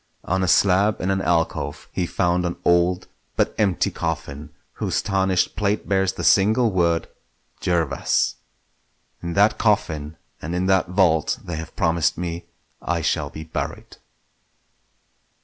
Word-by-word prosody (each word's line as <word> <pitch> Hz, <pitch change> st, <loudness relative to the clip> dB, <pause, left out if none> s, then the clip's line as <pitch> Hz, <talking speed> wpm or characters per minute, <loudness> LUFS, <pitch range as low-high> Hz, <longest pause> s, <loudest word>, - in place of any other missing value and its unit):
On 95 Hz, +2 st, 0 dB
a 95 Hz, -, +1 dB
slab 100 Hz, +3 st, +3 dB
in 95 Hz, -, 0 dB
an 95 Hz, 0 st, 0 dB
alcove 85 Hz, -3 st, -1 dB
he 90 Hz, -, -2 dB
found 90 Hz, -1 st, +1 dB
an 85 Hz, -1 st, -2 dB
old 85 Hz, +1 st, +2 dB, 0.3 s
but -, -, +1 dB
empty 100 Hz, -5 st, +1 dB
coffin 70 Hz, +2 st, -4 dB, 0.3 s
whose -, -, -1 dB
tarnished 95 Hz, -2 st, +1 dB
plate 105 Hz, 0 st, -1 dB
bears 95 Hz, -1 st, +1 dB
the -, -, -6 dB
single 110 Hz, +4 st, +4 dB
word 85 Hz, -3 st, +1 dB, 0.5 s
"Jervas". 85 Hz, -5 st, 0 dB, 0.8 s
In 85 Hz, 0 st, -4 dB
that 105 Hz, +3 st, +3 dB
coffin 80 Hz, -8 st, 0 dB, 0.2 s
and 85 Hz, +3 st, -4 dB
in 90 Hz, +1 st, 0 dB
that 95 Hz, -1 st, +3 dB
vault 90 Hz, -4 st, +2 dB
they 85 Hz, -2 st, -5 dB
have 80 Hz, 0 st, -8 dB
promised 85 Hz, -2 st, +1 dB
me 85 Hz, 0 st, -4 dB, 0.4 s
I 85 Hz, -1 st, -1 dB
shall 75 Hz, -2 st, 0 dB
be 80 Hz, -, -8 dB
buried. 80 Hz, -, -6 dB
90 Hz, 140 wpm, -22 LUFS, 85-95 Hz, 0.8 s, single